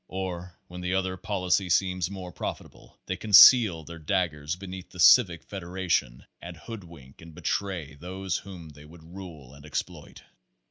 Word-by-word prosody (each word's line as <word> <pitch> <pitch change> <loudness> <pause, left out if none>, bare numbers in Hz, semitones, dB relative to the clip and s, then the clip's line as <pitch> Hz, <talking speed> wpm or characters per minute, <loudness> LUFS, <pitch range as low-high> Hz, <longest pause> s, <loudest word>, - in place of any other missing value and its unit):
Or 90 -2 -6
when 90 +1 -9
the 90 +1 -1
other 95 -1 -1
policy 90 -1 -1
seems 90 0 +1
more 95 -2 -8
profitable, - - -8
they 95 - -3
conceal 105 -2 +7
their 85 +2 -10
daggers 80 -1 -2
beneath 95 0 -9
the 90 - -14
Civic 90 -2 +6
Federation 90 -9 -3 0.2
and - - -9
hoodwink 85 - -12
and 80 -1 -13
betray 90 -7 -3
those 90 +4 -4
whom 90 -5 -10
they 75 0 -15
would 80 +1 -15
rule 80 -6 -11
and 70 0 -15
exploit. 75 -1 -6
90 Hz, 150 wpm, -27 LUFS, 80-95 Hz, 0.2 s, conceal